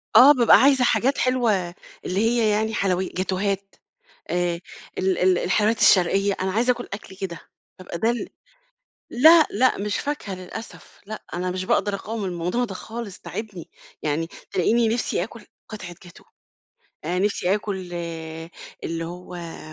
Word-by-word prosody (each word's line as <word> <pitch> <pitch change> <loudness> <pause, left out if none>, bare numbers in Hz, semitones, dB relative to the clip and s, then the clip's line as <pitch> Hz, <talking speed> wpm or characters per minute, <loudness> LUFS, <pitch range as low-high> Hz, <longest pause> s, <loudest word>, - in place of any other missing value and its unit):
آه، 255 +6 +10
بابقى 240 -5 +6
عايزة 270 -1 +5
حاجات 265 +2 +2
حلوة 255 -3 +2 0.5
اللي 185 - -1
هي 225 0 +2
يعني 215 +1 +1
حلوي 190 -3 +1
جاتوهات، 195 +1 -2 0.6
آآ، 175 -1 0 0.4
ال 190 0 +1
ال 185 -1 +3
الحلويات 215 +4 +1
الشرقية، 195 +2 +4
أنا 190 0 0
عايزة 240 +5 +3
آكل 245 0 -8
أكل 200 -1 -8
كده، 185 -3 -5 0.4
بابقى 175 -2 -7
ده 225 +6 +2
ال 240 - -3 0.8
لأ 315 +5 +7
لأ 255 -4 +2
مش 205 0 -2
فاكهة 285 -9 -3
للأسف، 185 +5 -10
لأ، 215 +1 -7
أنا 180 +1 -2
مش 185 +1 -3
باقدر 205 +2 +1
اقاوم 210 +2 -4
الموضوع 180 +6 -1
ده 205 -5 -6
خالص، 220 0 -7
تاعبني، 200 -4 -7 0.3
يعني 155 +2 -1 0.2
تلاقيني 225 +5 +2
نِفسي 225 -5 0
آكُل 225 +1 -12 0.2
قطعة 190 -5 -8
جاتوه، 175 - -15 0.8
آآ 175 +3 -1
نفسي 195 -1 +1
آكل 205 -1 -3 1.1
اللي 165 0 -3
هو 175 0 -8
200 Hz, 145 wpm, -23 LUFS, 180-230 Hz, 1.1 s, آه